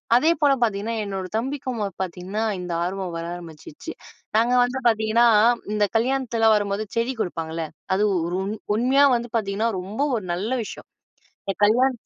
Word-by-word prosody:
அதே 310 +7 +5
போல 285 -2 +5
பாத்தீங்கன்னா, 220 0 -1
என்னோட 195 -2 -4
தம்பிக்கும் 255 -1 -3 0.2
பாத்தீங்கன்னா 185 +4 -4 0.2
இந்த 180 -1 -5
ஆர்வம் 185 -1 -4
வர 165 - -4
ஆரம்பிச்சிச்சு. 165 - -10 0.5
நாங்க 235 +2 +3
வந்து 245 +2 -2
பாத்தீங்கன்னா 220 +1 +3 0.5
இந்த 210 0 +1
கல்யாணத்துலாம் 230 -3 +2
வரும்போது 205 0 -1
செடி 230 +3 +1
கொடுப்பாங்கள்ல, 165 -2 -3 0.3
அது 200 - +1 0.2
ஒரு 175 +1 -2
உண் 205 +3 -4 0.2
உண்மையா 260 +4 +4
வந்து 240 0 -3
பாத்தீங்கன்னா 215 +1 -1
ரொம்ப 200 +7 -5 0.2
ஒரு 210 - -6
நல்ல 190 +6 -3
விஷ்யம். - - -9 0.6
இந்த 195 - -1
கல்யாண 245 +6 +4
215 Hz, 150 wpm, -23 LUFS, 190-240 Hz, 0.6 s, அதே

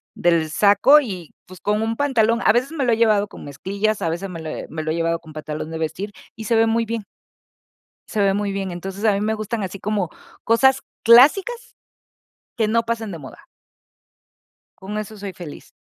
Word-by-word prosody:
del 165 -3 +1
saco 205 - +6
y, 185 - -7 0.2
pues, 185 -1 -12
con 210 +1 0
un 225 +1 -1
pantalón. 235 -4 +2
A - - +7
veces 250 +6 0
me 285 -5 -1
lo 240 - +2
he 225 - +1
llevado 215 -3 +3
con - - -12
mezclillas, 200 +9 -2
a 165 - +1
veces 175 +4 -4
me 170 -3 -7
lo 160 - -6
he - - -6
me 155 0 -5
lo 155 - -2
he - - -1
llevado 165 0 0
con 160 -1 -14
pantalón 155 +1 -6
de 160 - -4
vestir 160 +6 -3 0.2
y 220 - -8
se 230 - +1
ve 225 0 +4
muy 230 +1 +1
bien. 225 -1 -3 1.1
Se 215 - -2
ve 195 -1 +3
muy 205 -1 -1
bien. 195 -1 -3
Entonces 190 +4 -6
a 215 - +5
mí 200 - -1
me 220 +1 0
gustan 215 0 -3
así 190 +1 -5
como 205 -5 -1 0.3
cosas 265 +4 +4 0.2
clásicas, 375 - +5 0.8
que 220 -3 +1
no 230 +1 +2
pasen 230 -2 -3
de 170 - -6
moda. 135 -4 -12 1.3
Con 205 +3 -5
eso 215 +1 -6
soy 200 -1 -6
feliz. 170 -5 -10
205 Hz, 210 wpm, -21 LUFS, 175-230 Hz, 1.3 s, A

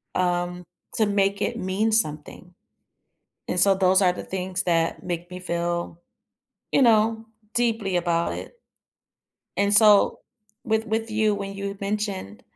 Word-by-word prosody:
um, 180 0 -1 0.3
to 220 - +3
make 200 0 +1
it 235 - -1
mean 205 +2 0
something. 175 -3 -2 0.9
And, 180 - -1
so, 195 +2 +5
those 190 0 +4
are 180 -2 +4
the - - -7
things 185 0 -3
that 165 -2 0
make 175 -1 -4
me 180 - -7
feel, 170 -1 -3 0.7
you 275 - +4
know, 225 -1 +3 0.3
deeply 225 -6 0
about 170 -1 0
it. 480 - -9 1.0
And, 200 0 +2
so, 210 -1 +5 0.4
with 220 0 0
with 225 +1 -2
you, 215 -1 +2
when 200 -1 -5
you 200 0 -5
mentioned, 200 - -4
195 Hz, 140 wpm, -24 LUFS, 180-215 Hz, 1.0 s, so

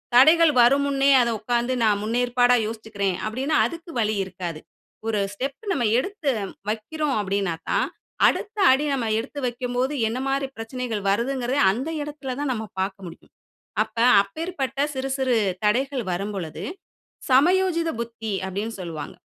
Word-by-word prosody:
தடைகள் 315 +5 +7
வரும் 275 +4 +5
முன்னே 275 0 +3
அத 235 - +1
உட்கார்ந்து 240 +3 0
நான் 205 -2 +3
முன்னேற்பாடா 245 +2 +3
யோசிச்சுக்கிறேன் 215 -4 -3
அப்பிடின்னா 265 +8 -1
அதுக்கு 335 0 -6
வழி 215 -1 +1
இருக்காது. 175 -4 -6 0.5
ஒரு 215 -2 +1
ஸ்டெப் 275 - -4
நம்ம 245 - 0 0.2
எடுத்து 355 -3 -3 0.4
வைக்கிறோம் 275 +7 -2
அப்பிடினாக்கா, 195 -4 -1 0.5
அடுத்த 425 +1 -1
அடி 280 +3 +2
நம்ம 250 -4 -1
எடுத்து 275 +5 -6
வைக்கும்போது 250 +2 -1
என்னமாரி 270 +3 -1
பிரச்சனைகள் 225 -1 -4
வருதுங்கிறதையும் 245 0 +1
அந்த 260 +9 -3
இடத்தில 290 -3 -5
தான் 290 -2 -1
நம்ம 220 -2 -4
பார்க்க 190 0 -3
முடியும். 170 0 -12 0.5
அப்ப 220 +1 -3 0.3
அப்பேற்பட்ட 275 - -4
சிறு 265 +1 -3
சிறு 260 -3 +1 0.3
தடைகள் 255 +4 +1
வரும்பொழுது, 190 -3 -4 0.7
'சமயோசித 335 +5 +3
புத்தி' 225 -3 -4
அப்பிடின்னு 205 +4 -4
சொல்லுவாங்க. 160 -4 -6
245 Hz, 130 wpm, -24 LUFS, 215-275 Hz, 0.7 s, தடைகள்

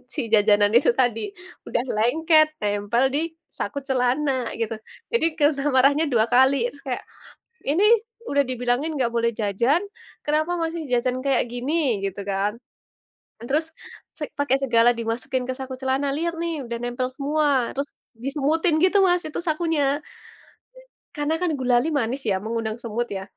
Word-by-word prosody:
si - - -1
jajanan 205 -1 +5
itu 250 - +3
tadi 245 -3 +2 0.5
udah 240 - 0
lengket 310 +8 +4
nempel 205 +3 0
di - - +2 0.4
saku 245 +7 -3
celana 265 +3 +1 0.3
gitu 225 0 -1 0.4
jadi 470 - +3
kena 290 -2 +2
marahnya 280 +4 +4
2 220 -2 +4
kali 265 +2 +6 0.2
terus 285 - -16
kayak, 250 - -3 0.7
"Ini 345 +8 +3 0.5
udah 285 - +3
dibilangin 250 +4 0
nggak 245 -4 0
boleh 235 0 +2
jajan 235 - +2 0.4
kenapa 310 +3 +1
masih 330 0 -2
jajan 250 +1 +1
kayak 270 -3 +2
gini." 250 +6 -2 0.3
gitu 195 +1 -3
kan, 195 +1 0 1.0
"Terus 305 +4 +1 0.5
se 300 - -3 0.2
pakai 285 -2 +2
segala 235 -2 +5
dimasukin 235 +3 -2
ke 260 - -1
saku 265 -1 -6
celana 265 +1 0
lihat 335 +2 -1
nih 335 -1 -2
udah 235 0 -4
nempel 245 +1 -2
semua." 295 +1 +1 0.2
terus 280 +1 -2 0.4
disemutin 305 +4 +1
gitu 375 +2 +4
Mas 355 -1 +2
itu 305 - -4
sakunya, 320 -1 +1 1.3
karena 295 +1 0
kan 355 - +1
gulali 250 +3 +2
manis 255 +2 -2
ya 190 - +2
mengundang 225 -1 -2
semut 235 +1 -2
ya, 190 - -4
260 Hz, 150 wpm, -23 LUFS, 235-300 Hz, 1.3 s, kali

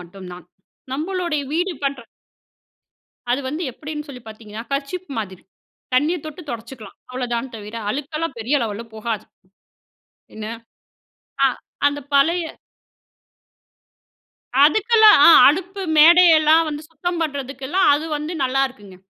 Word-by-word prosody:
மட்டுந்தான். 180 -1 -11 0.5
நம்மளுடைய 330 0 -2
வீடு 355 +3 0
பண்ற 275 -2 -2 1.3
அது 270 +3 0
வந்து 305 +5 -4
எப்படின்னு 300 +3 -7
சொல்லி 255 -4 -10
பாத்தீங்கன்னா 220 0 -9
கர்ச்சீப் 290 +7 -4
மாதிரி. 190 -4 -7 0.5
தண்ணிய 295 +7 +2
தொட்டு 310 +3 -8
தொடச்சுக்கலாம். 235 0 -9
அவ்வளோதான் 250 0 -4
தவிர, 210 +1 -9
அழுக்கெல்லாம் 290 +2 -4
பெரிய 245 +7 0
லெவல்ல 215 +1 -5
போகாது. 220 -1 -4 1.1
என்ன? 215 0 -7 1.0
அ - - +7 0.4
அந்த 285 0 0
பழைய 335 +5 +3 2.2
அதுக்கெல்லாம், 435 +5 +6
அ - - +10 0.2
அடுப்பு 375 +6 0 0.2
மேடையெல்லாம் 325 -1 +6
வந்து 295 0 -5
சுத்தம் 335 +2 -4
பண்ணுறதுக்கெல்லாம் 280 +3 -1
அது 300 +3 -1
வந்து 300 +3 -5
நல்லாயிருக்குங்க. 255 -7 -2
285 Hz, 105 wpm, -21 LUFS, 235-325 Hz, 2.2 s, அ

